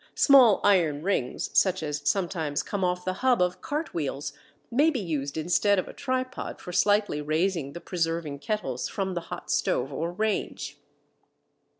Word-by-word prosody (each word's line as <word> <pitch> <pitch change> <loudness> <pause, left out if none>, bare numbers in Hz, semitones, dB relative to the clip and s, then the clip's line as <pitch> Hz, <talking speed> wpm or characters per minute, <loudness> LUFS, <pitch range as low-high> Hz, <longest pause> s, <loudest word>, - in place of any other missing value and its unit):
Small 255 -8 +6
iron 165 -7 +3
rings, 175 -10 -1
such 185 -3 +3
as 150 -1 -3
sometimes 170 -6 -1
come 200 -2 -3
off 180 0 0
the 185 - 0
hub 255 -2 +3
of 180 0 0
cart 305 +3 -3
wheels, 140 -2 -3 0.4
may 285 +7 +4
be 285 -6 -1
used 150 -6 -3
instead 180 +5 +2
of 185 - -1
a - - -9
tripod 255 -1 -3
for 180 - -8
slightly 205 -6 +2
raising 155 -1 -1
the 170 - -8
preserving 165 -4 -2
kettles 145 - -3
from 190 -2 -2
the 175 - -2
hot - - -6
stove 135 +3 0
or 165 +5 -2
range. 215 +4 -2
180 Hz, 165 wpm, -27 LUFS, 155-205 Hz, 0.4 s, Small